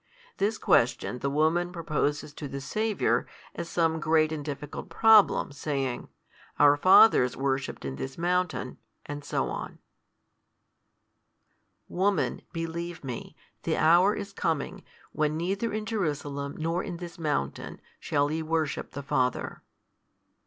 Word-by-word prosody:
This 210 Hz, +2 st, 0 dB
question 125 Hz, +1 st, +2 dB
the 140 Hz, -, -1 dB
woman 160 Hz, +5 st, +1 dB
proposes 150 Hz, -4 st, -2 dB
to 150 Hz, -, -6 dB
the 140 Hz, 0 st, -5 dB
Saviour, 215 Hz, +9 st, 0 dB, 0.3 s
as 170 Hz, -, -6 dB
some 165 Hz, -1 st, +1 dB
great 155 Hz, 0 st, +2 dB
and 155 Hz, -2 st, -4 dB
difficult 145 Hz, 0 st, -6 dB
problem, 220 Hz, -8 st, +5 dB
saying, 135 Hz, -3 st, -3 dB, 0.5 s
Our 145 Hz, 0 st, +6 dB
fathers 145 Hz, -, +6 dB
worshipped 135 Hz, -, -2 dB
in 65 Hz, -1 st, -4 dB
this 135 Hz, 0 st, -6 dB
mountain, 175 Hz, -5 st, -1 dB, 0.3 s
&c. 145 Hz, 0 st, -5 dB, 2.5 s
Woman, 195 Hz, +2 st, 0 dB
believe 165 Hz, 0 st, -5 dB
Me, 125 Hz, -3 st, -6 dB, 0.3 s
the -, -, -1 dB
hour 175 Hz, +6 st, +5 dB
is 200 Hz, -1 st, -6 dB
coming, 165 Hz, +4 st, -2 dB, 0.3 s
when 155 Hz, 0 st, 0 dB
neither 195 Hz, +7 st, -1 dB
in 215 Hz, 0 st, -3 dB
Jerusalem 145 Hz, -9 st, -3 dB
nor 165 Hz, +3 st, -1 dB
in 175 Hz, -, -5 dB
this 175 Hz, 0 st, -9 dB
mountain, 145 Hz, -, -2 dB, 0.2 s
shall 145 Hz, 0 st, 0 dB
ye 160 Hz, +1 st, -1 dB
worship 160 Hz, -2 st, -2 dB
the 140 Hz, -, -6 dB
Father. 130 Hz, -2 st, -1 dB
155 Hz, 125 wpm, -28 LUFS, 140-175 Hz, 2.5 s, Our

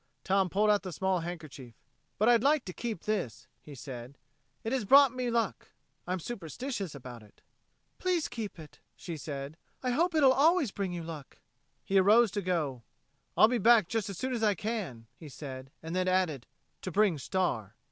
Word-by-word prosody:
Tom 190 Hz, -1 st, +2 dB
pulled 210 Hz, +4 st, +3 dB
out 205 Hz, -, +3 dB
the 185 Hz, -, -6 dB
small 190 Hz, +2 st, 0 dB
handkerchief. 155 Hz, -8 st, -8 dB, 0.4 s
"But 215 Hz, -, +2 dB
I'd 240 Hz, -2 st, +5 dB
like 285 Hz, +1 st, +3 dB
to 180 Hz, -, -6 dB
keep 225 Hz, -5 st, -5 dB
this," 130 Hz, -, -2 dB, 0.2 s
he 145 Hz, -, -11 dB
said. 130 Hz, 0 st, -9 dB, 0.5 s
"It 225 Hz, -, -2 dB
has 260 Hz, -3 st, 0 dB
brought 275 Hz, +4 st, +7 dB
me 255 Hz, -1 st, -2 dB
luck. 230 Hz, -3 st, -1 dB, 0.4 s
I'm 185 Hz, +1 st, -1 dB
superstitious 200 Hz, -, -5 dB
about 125 Hz, -3 st, -9 dB
it." 105 Hz, -1 st, -21 dB, 0.6 s
"Please 360 Hz, -4 st, 0 dB
keep 225 Hz, -5 st, -6 dB
it," 155 Hz, -2 st, -13 dB, 0.2 s
she 170 Hz, -, -7 dB
said. 145 Hz, 0 st, -6 dB, 0.3 s
"I 250 Hz, -, +1 dB
hope 335 Hz, +6 st, +1 dB
it'll 275 Hz, -4 st, +6 dB
always 300 Hz, -, +3 dB
bring 195 Hz, -2 st, -3 dB
you 175 Hz, -1 st, -5 dB
luck." 160 Hz, -4 st, -9 dB, 0.5 s
He 195 Hz, 0 st, +3 dB
arose 215 Hz, +3 st, +5 dB
to 205 Hz, -, -2 dB
go. 160 Hz, -9 st, -1 dB, 0.6 s
"I'll 215 Hz, -, +8 dB
be 245 Hz, +1 st, 0 dB
back 225 Hz, -3 st, +5 dB
just 220 Hz, -1 st, -2 dB
as 195 Hz, -, -6 dB
soon 260 Hz, +5 st, -2 dB
as 235 Hz, -, -2 dB
I 210 Hz, -2 st, +3 dB
can," 190 Hz, -, -4 dB
he 155 Hz, -, -11 dB
said, 130 Hz, -1 st, -8 dB
then 160 Hz, +1 st, -6 dB
he -, -, +3 dB
added: 165 Hz, -9 st, 0 dB, 0.3 s
"to 185 Hz, -, -5 dB
bring 195 Hz, -5 st, +2 dB
Star." 125 Hz, -, -2 dB
190 Hz, 190 wpm, -30 LUFS, 150-230 Hz, 0.6 s, I'll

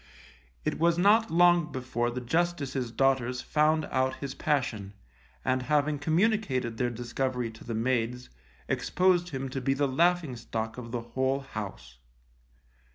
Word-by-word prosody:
It -, -, -1 dB
was 170 Hz, +1 st, +3 dB
not 210 Hz, +5 st, +4 dB
long 175 Hz, -1 st, +4 dB
before 125 Hz, -2 st, -2 dB
the 125 Hz, +1 st, -4 dB
Justice's 140 Hz, -3 st, -1 dB
daughters 125 Hz, 0 st, +1 dB
found 155 Hz, +1 st, +2 dB
out 130 Hz, 0 st, +1 dB
his 140 Hz, -2 st, -6 dB
passion, 115 Hz, -9 st, -1 dB, 0.5 s
and 130 Hz, 0 st, +1 dB
having 150 Hz, +2 st, +1 dB
communicated 155 Hz, -, +1 dB
their 125 Hz, +1 st, +1 dB
discovery 120 Hz, 0 st, -2 dB
to 110 Hz, -, -14 dB
the 115 Hz, -, -4 dB
maids, 125 Hz, +1 st, -1 dB, 0.4 s
exposed 180 Hz, -1 st, +2 dB
him 135 Hz, -3 st, -4 dB
to 130 Hz, +1 st, -4 dB
be 135 Hz, +2 st, +1 dB
the 140 Hz, +1 st, +1 dB
laughing 165 Hz, 0 st, +2 dB
stock 115 Hz, 0 st, -4 dB
of 115 Hz, -2 st, -8 dB
the 120 Hz, -1 st, -2 dB
whole 130 Hz, +3 st, -1 dB
house. 95 Hz, -, -8 dB
130 Hz, 145 wpm, -28 LUFS, 120-155 Hz, 0.5 s, not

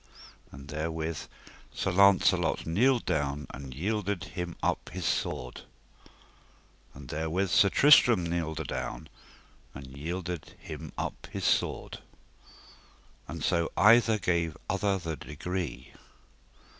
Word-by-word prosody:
And 70 Hz, +1 st, -11 dB
therewith 80 Hz, +1 st, -3 dB, 0.5 s
Sir 100 Hz, -, -2 dB
Launcelot 100 Hz, +1 st, +4 dB
kneeled 120 Hz, +9 st, +2 dB
down 75 Hz, -3 st, -1 dB
and 70 Hz, -1 st, -8 dB
yielded 100 Hz, +2 st, -2 dB
him 90 Hz, -2 st, -5 dB
up -, -, -1 dB
his 90 Hz, +2 st, -5 dB
sword. 60 Hz, -2 st, -2 dB, 1.3 s
And 65 Hz, -2 st, -11 dB
therewith 80 Hz, +5 st, -1 dB
Sir 100 Hz, -, +5 dB
Tristram 120 Hz, -6 st, +6 dB
kneeled 85 Hz, -2 st, -2 dB
adown, 65 Hz, 0 st, -5 dB, 0.7 s
and 70 Hz, -, -8 dB
yielded 85 Hz, +3 st, -5 dB
him -, -, -8 dB
up -, -, -4 dB
his -, -, -4 dB
sword. -, -, 0 dB, 1.3 s
And 80 Hz, +1 st, -6 dB
so 85 Hz, -1 st, +1 dB
either 115 Hz, +1 st, +6 dB
gave 85 Hz, -5 st, 0 dB
other 100 Hz, 0 st, +1 dB
the 80 Hz, -4 st, -5 dB
degree. 75 Hz, -3 st, -5 dB
85 Hz, 110 wpm, -29 LUFS, 75-95 Hz, 1.3 s, Tristram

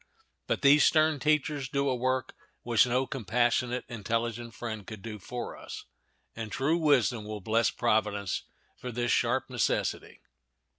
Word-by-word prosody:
But -, -, -1 dB
these 145 Hz, +2 st, +7 dB
stern 155 Hz, -2 st, +4 dB
teachers 150 Hz, -2 st, 0 dB
do 140 Hz, 0 st, 0 dB
a 130 Hz, -, +1 dB
work 130 Hz, +1 st, -1 dB, 0.3 s
which 120 Hz, 0 st, +4 dB
no 125 Hz, +2 st, +1 dB
compassionate, 120 Hz, +1 st, 0 dB
intelligent 115 Hz, +1 st, -3 dB
friend 110 Hz, -4 st, -6 dB
could 110 Hz, -3 st, -8 dB
do 110 Hz, -2 st, -6 dB
for 120 Hz, +5 st, -6 dB
us, -, -, -9 dB, 0.5 s
and 115 Hz, -2 st, -6 dB
true 155 Hz, +6 st, +1 dB
wisdom 130 Hz, -7 st, +3 dB
will 105 Hz, 0 st, -6 dB
bless 110 Hz, +2 st, +2 dB
Providence 105 Hz, -3 st, 0 dB, 0.4 s
for 125 Hz, -, -5 dB
this 120 Hz, +1 st, -1 dB
sharp 120 Hz, +2 st, +1 dB
necessity. 125 Hz, -3 st, -1 dB
120 Hz, 145 wpm, -29 LUFS, 110-130 Hz, 0.5 s, these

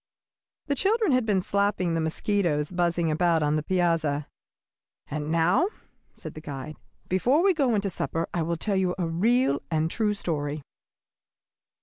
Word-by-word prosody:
The 285 Hz, -, 0 dB
children 410 Hz, -, +2 dB
had 255 Hz, -3 st, +2 dB
been 195 Hz, -3 st, +2 dB
slapping 200 Hz, -4 st, 0 dB
the 165 Hz, -, 0 dB
mosquitoes 160 Hz, -2 st, 0 dB
buzzing 170 Hz, -2 st, +1 dB
about 165 Hz, 0 st, +2 dB
on 150 Hz, 0 st, +1 dB
the 155 Hz, -, +1 dB
piazza. 160 Hz, -4 st, 0 dB, 0.8 s
"And 150 Hz, +1 st, -4 dB
now," 170 Hz, -, +3 dB, 0.4 s
said -, -, -9 dB
the 155 Hz, -, -9 dB
guide, 145 Hz, 0 st, -7 dB, 0.3 s
"before 250 Hz, -, +2 dB
we 390 Hz, -1 st, +5 dB
go 270 Hz, -8 st, +1 dB
into 200 Hz, -1 st, -1 dB
supper, 165 Hz, -1 st, -2 dB
I 170 Hz, -, 0 dB
will 170 Hz, +1 st, -1 dB
tell 200 Hz, +4 st, -1 dB
you 185 Hz, -1 st, +1 dB
a 180 Hz, -, -1 dB
real 190 Hz, -, +2 dB
and 160 Hz, -2 st, +1 dB
a -, -, -1 dB
true 210 Hz, -2 st, 0 dB
story. 150 Hz, -6 st, -3 dB
175 Hz, 160 wpm, -26 LUFS, 155-205 Hz, 0.8 s, we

